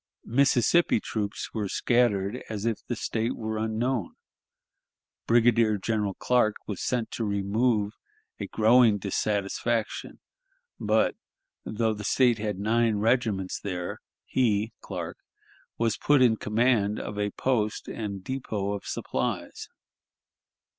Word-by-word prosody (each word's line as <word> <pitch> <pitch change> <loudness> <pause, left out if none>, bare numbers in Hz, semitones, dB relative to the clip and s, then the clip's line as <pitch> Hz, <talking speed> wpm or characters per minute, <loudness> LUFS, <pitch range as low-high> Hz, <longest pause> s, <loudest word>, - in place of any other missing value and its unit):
Mississippi 135 +4 +3
troops 105 -1 -4
were 105 -3 -2
scattered 120 -2 +1
as 105 -1 -4
if 115 -3 -1
the 120 - -2
State 115 +1 -2
were 110 -1 -3
unknown. 110 -1 -1 1.1
Brigadier 115 -2 +4
General 105 -1 -1
Clark 120 -4 +2
was 100 -4 -5
sent 125 -3 -1
to 115 - -3
remove 105 +1 +1 0.5
a - - -4
growing 115 0 +5
dissatisfaction, 105 +3 -2 0.6
but, - - +2 0.5
though 110 0 0
the 105 0 -7
State 120 +1 +3
had 105 -2 -2
nine 110 +2 +2
regiments 105 -3 0
there, 90 -3 -4 0.3
he 110 -3 +1
(Clark) - - -6 0.6
was 115 -2 +1
put 145 -1 +3
in 120 -3 +5
command 105 -1 +1
of 105 - -5
a 105 0 0
post 110 -3 -1
and 100 -4 -5
depot 105 -6 -3
of 100 - -6
supplies. - - -3
110 Hz, 120 wpm, -27 LUFS, 105-120 Hz, 1.1 s, growing